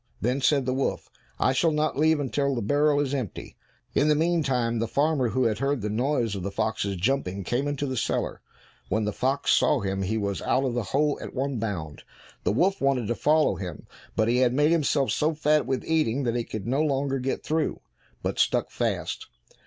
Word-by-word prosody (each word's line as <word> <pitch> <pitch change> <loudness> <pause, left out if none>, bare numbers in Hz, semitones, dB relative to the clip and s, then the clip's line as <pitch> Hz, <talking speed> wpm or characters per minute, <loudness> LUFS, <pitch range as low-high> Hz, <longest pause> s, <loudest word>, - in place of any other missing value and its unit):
Then 125 +5 0
said 140 -1 +3
the 130 - 0
wolf, 135 +1 -2 0.3
"I 130 - +2
shall 165 +6 +3
not 155 0 0
leave 155 +2 +3
until 140 0 0
the 120 - -2
barrel 145 +5 +3
is 140 -1 -1
empty." 125 -9 -5 0.4
In 145 - +3
the 150 - +4
meantime 135 -8 +1
the 115 - 0
farmer, 140 -1 +1
who 130 +3 +1
had 110 -3 +1
heard 140 -1 0
the 105 +1 -2
noise 120 -1 0
of 100 - -4
the 100 - -3
fox's 110 -1 -1
jumping, 100 -2 -1
came 125 +9 -1
into 145 0 -2
the 130 -2 -3
cellar. 115 - -2 0.5
When 110 +3 +1
the 105 - -2
fox 135 +2 0
saw - - +3
him 95 0 -2
he 100 +4 -1
was 100 -2 -2
out 130 - +1
of 125 - -1
the 120 -3 -2
hole 145 +1 +1
at - - -8
one 135 -1 -1
bound. 85 -9 -4 0.4
The - - +3
wolf 185 - +1
wanted 135 -5 +1
to - - +2
follow 155 +5 +2
him, 90 -5 -7 0.3
but 110 - +2
he 120 +1 +2
had 125 -1 +3
made 150 +3 +3
himself 145 -4 +2
so 155 +1 +1
fat 150 -3 +2
with 130 -1 -1
eating 140 -5 +1
that 120 -2 0
he 120 -1 -1
could 105 -3 -6
no 135 +5 +1
longer 135 -2 0
get 130 +1 -2
through, 155 0 -1 0.4
but - - -2
stuck - - +2
fast. - - -2
130 Hz, 215 wpm, -26 LUFS, 110-145 Hz, 0.5 s, the